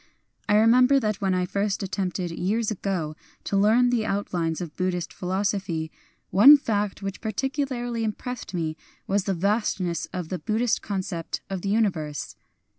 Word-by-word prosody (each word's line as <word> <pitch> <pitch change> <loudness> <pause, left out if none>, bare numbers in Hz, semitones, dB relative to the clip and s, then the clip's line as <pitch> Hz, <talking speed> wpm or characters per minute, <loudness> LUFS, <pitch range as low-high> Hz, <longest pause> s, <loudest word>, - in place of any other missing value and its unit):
I 205 - +5
remember 250 +5 +5
that 215 -4 -1
when 190 -2 +1
I 180 0 +1
first 200 +2 -1
attempted, 185 -2 -2
years 210 +6 -1
ago, 180 -6 -2 0.3
to - - -2
learn 225 +5 +4
the 235 -3 +1
out 200 -1 -2
lines 165 -2 0
of 170 -4 -6
Buddhist 180 -2 -2
philosophy, 185 -3 -2 0.4
one 250 +11 +9
fact 210 -6 -2
which 195 0 -5
particularly 245 0 -2
impressed 240 +3 -4
me 160 -2 -2 0.3
was 195 -1 0
the 195 - 0
vastness 190 -3 0
of 180 -3 -5
the 185 - -3
Buddhist 220 +6 0
concept 185 -4 -4
of 190 -2 -3
the 195 - -2
universe. 170 - -1
195 Hz, 155 wpm, -25 LUFS, 180-220 Hz, 0.4 s, one